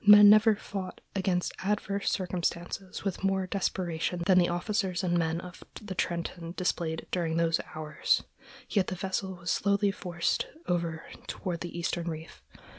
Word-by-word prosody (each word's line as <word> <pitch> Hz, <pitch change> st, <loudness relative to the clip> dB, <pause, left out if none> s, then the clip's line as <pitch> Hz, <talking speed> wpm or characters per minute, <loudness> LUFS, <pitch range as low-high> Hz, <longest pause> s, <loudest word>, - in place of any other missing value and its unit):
Men 205 Hz, 0 st, +10 dB
never 215 Hz, +1 st, +6 dB
fought 195 Hz, -2 st, -6 dB, 0.2 s
against 185 Hz, -2 st, 0 dB
adverse 200 Hz, 0 st, 0 dB
circumstances 180 Hz, +1 st, -2 dB
with 195 Hz, -1 st, -3 dB
more 195 Hz, -1 st, +2 dB
desperation 175 Hz, -3 st, -1 dB
than 185 Hz, -1 st, +6 dB
the 175 Hz, -, +3 dB
officers 185 Hz, +1 st, 0 dB
and 175 Hz, -1 st, +1 dB
men 165 Hz, -1 st, +1 dB
of 180 Hz, 0 st, -10 dB, 0.2 s
the 210 Hz, -3 st, -6 dB
Trenton 170 Hz, -1 st, -3 dB
displayed 170 Hz, -3 st, -1 dB
during 165 Hz, -2 st, 0 dB
those 165 Hz, -1 st, +2 dB
hours, 155 Hz, -1 st, +1 dB, 0.4 s
yet 195 Hz, -4 st, +1 dB
the 185 Hz, -, -2 dB
vessel 190 Hz, +1 st, -2 dB
was 175 Hz, 0 st, -3 dB
slowly 200 Hz, 0 st, +2 dB
forced 175 Hz, -3 st, -1 dB, 0.2 s
over 170 Hz, -2 st, -1 dB, 0.2 s
toward 175 Hz, -3 st, -3 dB
the 175 Hz, 0 st, -5 dB
eastern 170 Hz, 0 st, -1 dB
reef. 160 Hz, 0 st, -7 dB
180 Hz, 150 wpm, -29 LUFS, 170-195 Hz, 0.4 s, Men